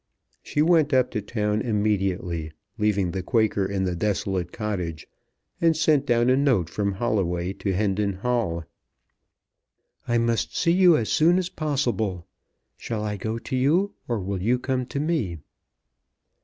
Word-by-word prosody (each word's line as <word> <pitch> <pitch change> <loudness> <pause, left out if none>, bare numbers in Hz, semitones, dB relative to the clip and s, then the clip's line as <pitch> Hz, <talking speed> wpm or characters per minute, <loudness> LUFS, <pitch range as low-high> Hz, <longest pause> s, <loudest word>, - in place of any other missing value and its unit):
She 150 - 0
went 160 -4 +3
up 130 -1 +3
to 110 - -2
town 105 0 -1
immediately, 95 -7 -1 0.3
leaving 100 -4 +1
the 95 - -3
Quaker 105 -2 +1
in 95 -1 -2
the 90 -2 -1
desolate 95 -2 -1
cottage, 90 -8 -4 0.6
and 165 -2 +3
sent 150 -3 +2
down 120 0 +3
a - - +5
note 130 - +2
from 100 +2 -1
Holloway 95 -4 -1
to 100 - -3
Hendon 100 +1 0
Hall. 95 -5 -1 1.4
"I 120 - +2
must 115 -9 0
see 170 - +3
you 175 -2 +6
as 110 -3 -2
soon 170 +3 +4
as 185 -1 -1
possible. 120 - -1 0.5
Shall 110 -2 -4
I 105 -1 -2
go 110 +3 -3
to 130 +3 -5
you, 165 +10 +2
or 120 -3 -1
will 95 0 -3
you 120 +6 +2
come 125 0 -2
to 140 - -4
me?" 145 - -1
105 Hz, 155 wpm, -25 LUFS, 95-130 Hz, 1.4 s, you